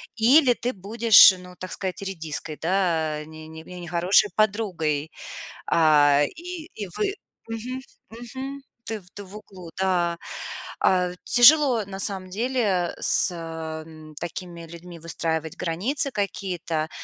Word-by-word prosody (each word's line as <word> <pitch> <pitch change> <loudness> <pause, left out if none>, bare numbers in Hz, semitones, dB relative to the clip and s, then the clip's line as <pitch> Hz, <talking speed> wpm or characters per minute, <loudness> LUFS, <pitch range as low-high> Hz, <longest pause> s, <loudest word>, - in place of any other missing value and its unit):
или 250 +3 +5
ты 245 +1 -3
будешь, 215 +1 +6
ну, 180 0 -13
так 185 - -6
сказать, 190 -1 -4
редиской 160 -5 -5
да, 160 -4 0
не 155 0 -12
не 160 0 -10
не 180 +2 -10
нехорошей 175 +4 +2
подругой. 180 -9 -1 0.6
А, 145 -3 +4
и 345 -1 -7
и 205 - -5
вы 400 -2 -1 0.3
Мгм, 240 +3 -5 0.3
мгм. 260 +4 -8 0.2
Ты 220 -1 -4
в 180 -1 -20
ты 205 - -8
в 195 +3 -12
углу, 185 -4 -12
да. 175 -3 +1 0.7
А, 180 -1 +2
тяжело 250 -2 +6
на 195 0 -8
самом 190 -2 -1
деле 210 -4 0
с, - - +5
э, 175 - -7 0.5
м, 155 -1 -13
такими 175 0 -7
людьми 170 +1 -11
выстраивать 160 -1 -3
границы 215 - -1
какие-то. 180 -6 -3
185 Hz, 135 wpm, -24 LUFS, 165-225 Hz, 0.7 s, будешь